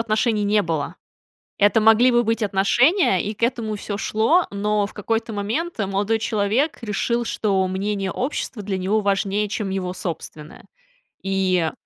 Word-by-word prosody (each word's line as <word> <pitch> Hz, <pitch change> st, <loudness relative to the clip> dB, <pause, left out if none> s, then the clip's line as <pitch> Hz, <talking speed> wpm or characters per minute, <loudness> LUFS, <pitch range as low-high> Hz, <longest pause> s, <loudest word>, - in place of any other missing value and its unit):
отношений 220 Hz, -1 st, +1 dB
не 205 Hz, 0 st, +3 dB
было. 165 Hz, +1 st, -3 dB, 0.6 s
Это 205 Hz, +2 st, +4 dB
могли 225 Hz, +3 st, +5 dB
бы 240 Hz, 0 st, +3 dB
быть 225 Hz, +1 st, -1 dB
отношения, 205 Hz, -, +3 dB
и 210 Hz, -, -3 dB
к 230 Hz, -, -6 dB
этому 230 Hz, -3 st, 0 dB
всё 205 Hz, 0 st, -5 dB
шло, 225 Hz, -, +2 dB
но 205 Hz, 0 st, 0 dB
в -, -, -15 dB
какой-то 225 Hz, +2 st, -2 dB
момент 225 Hz, +12 st, -3 dB
молодой 200 Hz, +2 st, 0 dB
человек 220 Hz, +7 st, 0 dB
решил, 235 Hz, +2 st, -1 dB
что 195 Hz, -4 st, 0 dB
мнение 195 Hz, +1 st, -2 dB
общества 250 Hz, -4 st, -4 dB
для 195 Hz, -1 st, -2 dB
него 205 Hz, +4 st, +1 dB
важнее, 200 Hz, +1 st, 0 dB
чем 205 Hz, -1 st, -3 dB
его 185 Hz, -1 st, -3 dB
собственное, 160 Hz, -3 st, -7 dB, 0.6 s
и 185 Hz, -4 st, +1 dB
210 Hz, 150 wpm, -22 LUFS, 195-225 Hz, 0.6 s, могли